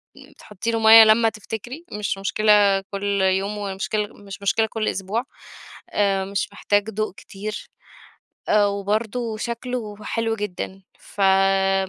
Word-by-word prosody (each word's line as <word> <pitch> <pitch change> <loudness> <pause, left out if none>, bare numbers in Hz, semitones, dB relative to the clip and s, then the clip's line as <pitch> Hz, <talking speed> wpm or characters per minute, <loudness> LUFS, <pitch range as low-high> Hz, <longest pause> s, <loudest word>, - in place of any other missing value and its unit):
بتحطّي 210 +3 -7
له 225 - 0
مَيّة 225 0 +9
لمّا 220 +1 +5
تفتكري، 225 - -8
مش 210 -2 -3
مشكلة 205 0 +3
كُل 200 0 -1
يوم 190 +2 +1
ومشكلة 205 +1 -2
مش 200 -1 -11
مشكلة 210 +3 +2
كُل 220 0 -3
أسبوع، 200 +5 -2 0.7
آآ 195 -2 +1
مش 200 +1 -2
محتاج 205 +1 0
ضوء 215 -2 -3
كتير، 205 +2 -8 0.8
آآ 210 -1 +4
وبرضه 215 +3 -2
شكله 235 -2 -4
حلو 225 -1 -1
جدًا، 195 -2 -5 0.2
ف 205 - -8
م 195 0 +3
205 Hz, 130 wpm, -22 LUFS, 195-220 Hz, 0.8 s, مَيّة